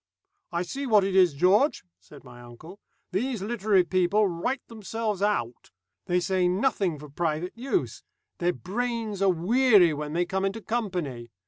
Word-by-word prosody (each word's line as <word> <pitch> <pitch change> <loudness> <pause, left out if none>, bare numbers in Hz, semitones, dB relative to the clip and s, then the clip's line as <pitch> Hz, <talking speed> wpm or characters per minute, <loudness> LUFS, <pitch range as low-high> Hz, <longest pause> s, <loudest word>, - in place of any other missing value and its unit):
"I 170 0 -1
see 275 +10 -5
what 210 -4 +5
it 190 0 -1
is, 180 -6 +5
George," 200 - +3 0.2
said 145 - -16
my 125 -2 -13
uncle, 140 - -13 0.3
"these 220 +2 -2
literary 205 -3 +2
people 185 +4 +2
write 190 +10 -3
themselves 220 -2 -4
out. 125 - -1 0.4
They 180 0 +2
say 185 0 +1
nothing 190 - 0
for 150 +1 -11
private 160 +4 -3
use. 270 +10 -2 0.4
Their 175 +1 +1
brains 225 0 -3
are 195 - +4
weary 195 0 +4
when 150 0 -5
they 175 +1 +1
come 190 +2 -2
into 195 +3 -1
company. 180 - -3
190 Hz, 155 wpm, -26 LUFS, 170-220 Hz, 0.4 s, what